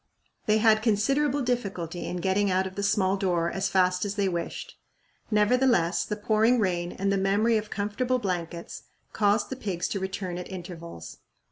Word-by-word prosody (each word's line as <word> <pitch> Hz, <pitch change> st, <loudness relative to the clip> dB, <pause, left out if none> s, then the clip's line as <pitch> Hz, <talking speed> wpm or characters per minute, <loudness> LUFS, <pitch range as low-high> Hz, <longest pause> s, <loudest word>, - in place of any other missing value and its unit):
They 215 Hz, 0 st, +4 dB
had 215 Hz, 0 st, +4 dB
considerable 275 Hz, +6 st, +1 dB
difficulty 195 Hz, -9 st, -3 dB
in 180 Hz, -, -3 dB
getting 195 Hz, +2 st, +1 dB
out 185 Hz, 0 st, +2 dB
of 190 Hz, -, -6 dB
the 200 Hz, -, -4 dB
small 200 Hz, -1 st, +2 dB
door 175 Hz, -3 st, 0 dB
as 195 Hz, 0 st, -1 dB
fast 180 Hz, -1 st, +2 dB
as 200 Hz, -1 st, -3 dB
they 200 Hz, -2 st, +1 dB
wished. 170 Hz, -2 st, -4 dB, 0.5 s
Nevertheless, 210 Hz, -4 st, +3 dB
the 210 Hz, -, -3 dB
pouring 220 Hz, +3 st, +2 dB
rain 175 Hz, -5 st, 0 dB
and 195 Hz, +1 st, -1 dB
the 195 Hz, -, +1 dB
memory 205 Hz, +4 st, +2 dB
of 215 Hz, -1 st, -1 dB
comfortable 210 Hz, +5 st, -1 dB
blankets 175 Hz, -6 st, -4 dB, 0.3 s
caused 205 Hz, +2 st, +2 dB
the -, -, -2 dB
pigs 195 Hz, -8 st, -3 dB
to 200 Hz, -, -2 dB
return 190 Hz, -2 st, -4 dB
at 180 Hz, -, -7 dB
intervals. 170 Hz, -, -8 dB
200 Hz, 170 wpm, -27 LUFS, 180-215 Hz, 0.5 s, They